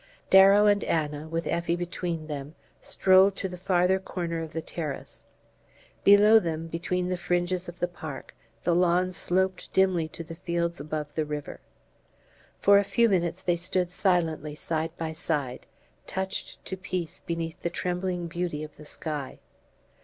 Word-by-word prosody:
Darrow 195 +2 +8
and 205 -1 +4
Anna, 150 -1 -1
with 165 +1 -2
Effie 170 0 0
between 175 -2 -3
them, 145 0 -6 0.3
strolled 190 +1 +4
to 195 - -3
the 180 - -7
farther 180 +1 +2
corner 170 -3 -4
of 160 -1 -6
the 165 - -3
terrace. 150 -5 -6 0.8
Below 210 +2 +8
them, 165 -4 -3
between 175 +2 -2
the 180 - -1
fringes 175 +1 -1
of 175 - -11
the 175 - +1
park, 160 -5 -8 0.3
the 175 - +2
lawn 180 +1 +3
sloped 185 +1 -1
dimly 185 -4 +3
to 165 - -8
the 165 +1 -9
fields 170 0 -2
above 150 0 -4
the 155 - 0
river. 150 -1 -5 1.0
For 200 0 +6
a - - +2
few 230 +4 +3
minutes 180 -1 0
they 175 - +2
stood 180 +1 0
silently 165 -5 0
side 160 +1 -2
by 160 -1 -3
side, 150 -6 -3 0.4
touched 190 0 -4
to 190 - -4
peace 185 -3 -4
beneath 165 0 -4
the 170 - -1
trembling 180 0 -2
beauty 170 -3 -3
of 150 -1 -10
the 150 - -12
sky. 150 -3 -4
175 Hz, 160 wpm, -27 LUFS, 160-185 Hz, 1.0 s, Darrow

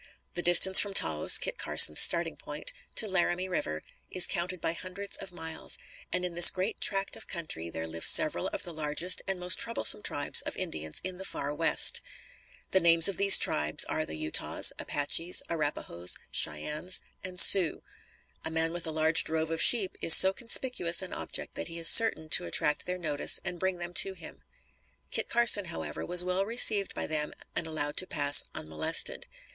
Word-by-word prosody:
The 175 - -6
distance 175 +2 +6
from 200 -1 -1
Taos, - - +4
Kit - - -6
Carson's - - +4
starting - - +2
point, - - -8 0.2
to 220 - 0
Laramie 185 -1 -4
River, 80 - -8 0.3
is 180 -1 +4
counted 180 +1 -5
by 165 - -5
hundreds 185 +3 -9
of 190 - -12
miles; 160 -2 -4 0.3
and 180 0 -5
in 180 - -8
this 175 0 +8
great 190 +4 -8
tract 195 0 -2
of - - -15
country, 155 - -7
there 80 0 -9
live 80 0 -10
several 85 - +2
of - - -9
the 175 - -9
largest 155 +3 -1
and 195 -1 -5
most 180 0 -1
troublesome 230 -2 +1
tribes 145 -7 +1
of - - -9
Indians 80 0 -7
in 185 -1 -9
the 190 - -11
far 145 -6 -9
West. - - +2 0.7
The 190 - 0
names 165 -2 +6
of 195 - -4
these 200 0 +8
tribes 75 +1 +1
are - - -6
the 80 - -10
Utahs, 80 0 0
Apaches, 165 +4 -1
Arrapahoes, 145 - -4
Cheyennes 150 - -2 0.2
and 185 -1 -8
Sioux. 185 -4 +5 0.6
A - - -8
man 160 0 -5
with 175 -1 -7
a - - -7
large 160 +1 -1
drove 160 0 -6
of 165 - -3
sheep 210 -6 +3
is 165 - +8
so 190 0 +7
conspicuous 230 -7 0
an 185 - -11
object - - -6
that - - -9
he 170 0 -12
is 165 0 +4
certain 225 -8 +2
to - - +2
attract 150 - -3
their 180 0 -6
notice 150 -5 -1
and 175 - -7
bring 190 0 -5
them 175 0 -9
to 195 +2 +2
him. 170 - -14 0.7
Kit - - -2
Carson, 235 -4 +2
however, 170 - -10
was 180 0 +4
well 185 +1 -5
received 215 -2 +4
by - - -6
them 150 -1 -6 0.2
and 160 - -6
allowed 145 -2 -6
to 185 - +1
pass 145 -1 +2
unmolested. 80 0 -2
175 Hz, 185 wpm, -25 LUFS, 155-190 Hz, 0.7 s, this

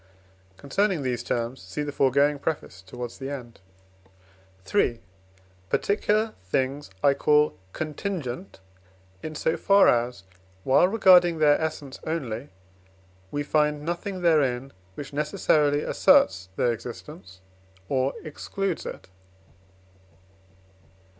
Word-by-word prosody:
(Concerning 180 +3 0
these 125 -2 -1
terms 120 +2 -3
see 95 +11 -5
the 145 - -4
foregoing 140 +2 +2
preface 140 -12 -4
towards 120 +5 -8
the 135 0 -5
end.) 125 -6 -8 1.1
III. 120 -1 +2 0.7
Particular 215 +2 +1
things 130 +8 -2
I 140 - +6
call 150 +2 +3 0.2
contingent 155 - -5 0.6
in 155 0 -6
so 160 - 0
far 200 0 +5
as, 120 -5 +1 0.4
while 135 - +5
regarding 180 -5 +5
their 150 0 +4
essence 150 -4 -4
only, 135 -5 -4 0.8
we 145 +6 -2
find 150 0 +1
nothing 180 +2 -4
therein, 135 -6 +2 0.2
which 140 -1 -8
necessarily 150 0 +1
asserts 95 0 +3
their 120 - +2
existence 115 - -10 0.5
or 130 +3 0
excludes 180 +4 -4
it. - - -8
145 Hz, 105 wpm, -26 LUFS, 125-160 Hz, 1.1 s, I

